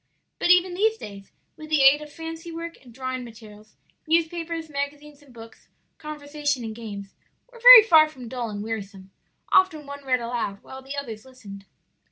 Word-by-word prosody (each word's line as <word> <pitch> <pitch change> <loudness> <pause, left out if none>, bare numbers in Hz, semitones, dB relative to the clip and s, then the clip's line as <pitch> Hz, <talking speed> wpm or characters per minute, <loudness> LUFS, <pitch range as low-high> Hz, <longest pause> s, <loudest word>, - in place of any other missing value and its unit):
But - - 0
even 360 0 +4
these 435 +4 +1
days, 200 - -11 0.2
with 310 0 -12
the 305 -3 +3
aid 275 +2 +6
of 300 -1 -11
fancy 325 +1 -8
work, 335 -1 -8
and 245 - -16
drawing 255 +1 -5
materials, 215 -2 -14 0.3
newspapers, 330 0 -1
magazines 290 0 -6
and 285 -3 -20
books, 225 -2 -15 0.3
conversation 290 -3 -4
and 220 -1 -6
games, 205 -3 -9 0.4
were 480 - -15
very - - +11
far 320 -7 +5
from 255 -5 -11
dull 240 -1 -5
and 205 -1 -6
wearisome; 200 -3 -7 0.4
often 325 -6 +3
one 280 0 -9
read 255 -2 0
aloud 235 -4 -4
while 265 0 -11
the 270 +2 -8
others 225 -6 -6
listened. 205 -7 -13
280 Hz, 175 wpm, -24 LUFS, 225-320 Hz, 0.4 s, very